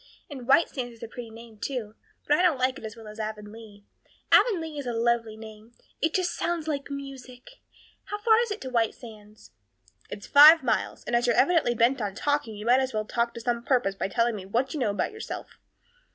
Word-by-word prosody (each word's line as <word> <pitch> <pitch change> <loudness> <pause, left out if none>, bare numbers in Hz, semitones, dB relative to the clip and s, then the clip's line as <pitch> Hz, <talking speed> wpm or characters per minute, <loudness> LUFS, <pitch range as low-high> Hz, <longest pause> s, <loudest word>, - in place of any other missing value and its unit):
And 260 -4 -8
White 275 +5 +5
Sands 245 -3 -6
is 230 - -14
a - - -5
pretty 235 0 -9
name, 225 -1 -13
too; 230 -4 -4 0.3
but 295 - +4
I 310 - +1
don't 350 -6 +3
like 255 +1 0
it - - -15
as 220 0 -7
well 225 -2 -12
as 210 +1 -11
Avonlea. 215 -1 -8 0.5
Avonlea 325 -10 +3
is 275 - -6
a 240 - -2
lovely 230 -1 0
name. 220 +1 -12 0.3
It 320 0 0
just 365 -1 +1
sounds 335 -2 -2
like 285 -3 -3
music. 275 - -10 0.4
How 415 - -4
far 440 +1 +4
is 475 -1 0
it 415 - -5
to 260 - -6
White 230 -3 +1
Sands?" 215 -3 -14 0.6
"It's 205 - -8
five 305 +3 +8
miles; - - -1
and 240 - -2
as 240 +1 +2
you're 240 - +3
evidently 285 -5 +3
bent 235 +3 +2
on 200 -2 -3
talking 285 -6 -1
you 210 +1 -8
might 245 +2 +5
as 260 -3 -2
well 215 0 -1
talk 235 +1 -1
to 235 - -7
some 235 0 -1
purpose 245 -7 +1
by 195 - -3
telling 230 +3 0
me 190 -2 -8
what 245 +6 -1
you 305 - -4
know 240 - +1
about 200 - -2
yourself." 435 +1 -8
240 Hz, 225 wpm, -26 LUFS, 220-285 Hz, 0.6 s, five